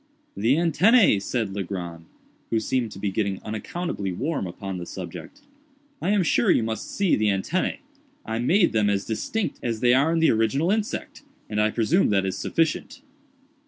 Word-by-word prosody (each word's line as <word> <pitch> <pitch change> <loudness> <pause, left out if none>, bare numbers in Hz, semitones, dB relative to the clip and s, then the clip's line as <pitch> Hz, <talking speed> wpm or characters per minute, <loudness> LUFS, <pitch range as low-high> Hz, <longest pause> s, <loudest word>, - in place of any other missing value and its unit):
"The 115 +7 +2
antennæ!" 175 - +4
said 110 -1 -2
Legrand, 85 -4 -5 0.4
who 115 - +1
seemed 120 0 -1
to - - -10
be 100 0 -2
getting 100 -1 -1
unaccountably 110 - -4
warm 135 - -2
upon 95 +1 -6
the 85 - -7
subject; 95 - -8 0.6
"I - - -1
am 205 -2 +3
sure 120 -7 +2
you - - +4
must 110 0 -4
see 200 -3 +2
the 110 - +1
antennæ. 105 - 0 0.5
I 110 +1 -3
made 175 - +3
them 105 -2 +2
as 100 -1 0
distinct 155 - -2
as 115 -2 -2
they 125 0 +4
are 140 +5 +3
in 165 - +1
the 165 0 +4
original 115 - +1
insect, 215 0 -3 0.3
and 105 0 +1
I 110 - +3
presume 130 - +2
that 100 -2 +2
is 95 0 -2
sufficient." 165 - -1
115 Hz, 175 wpm, -24 LUFS, 100-165 Hz, 0.6 s, antennæ